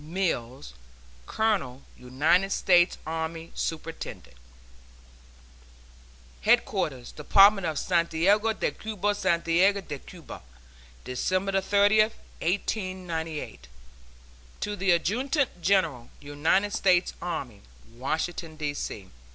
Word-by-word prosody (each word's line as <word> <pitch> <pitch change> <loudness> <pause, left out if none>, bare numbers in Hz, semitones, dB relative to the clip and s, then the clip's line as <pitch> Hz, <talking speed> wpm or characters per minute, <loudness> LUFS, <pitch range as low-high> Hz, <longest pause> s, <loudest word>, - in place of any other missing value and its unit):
MILLS, 150 - -3 0.5
Colonel 185 - -1
United 150 +10 +1
States 175 -2 +3
Army, 160 +1 -4
Superintendent. 165 - -6 2.1
HEADQUARTERS - - +1
DEPARTMENT 195 - +5
OF 155 -2 -3
SANTIAGO 180 +7 +2
DE - - -1
CUBA, 205 -2 -2
SANTIAGO 185 +1 +2
DE 150 -6 -7
CUBA, 170 +1 -11 0.6
December 185 +9 -1
30, 205 +2 +3
1898. 180 - -3 0.9
TO 205 0 -3
THE 195 -1 -1
ADJUTANT 240 - +1
GENERAL, 165 -10 +1
UNITED 155 +8 0
STATES 180 -2 +2
ARMY, 150 - -5 0.3
Washington, 160 +5 -3
D. 150 -2 -3
C. 100 -8 -6
175 Hz, 85 wpm, -27 LUFS, 155-195 Hz, 2.1 s, DEPARTMENT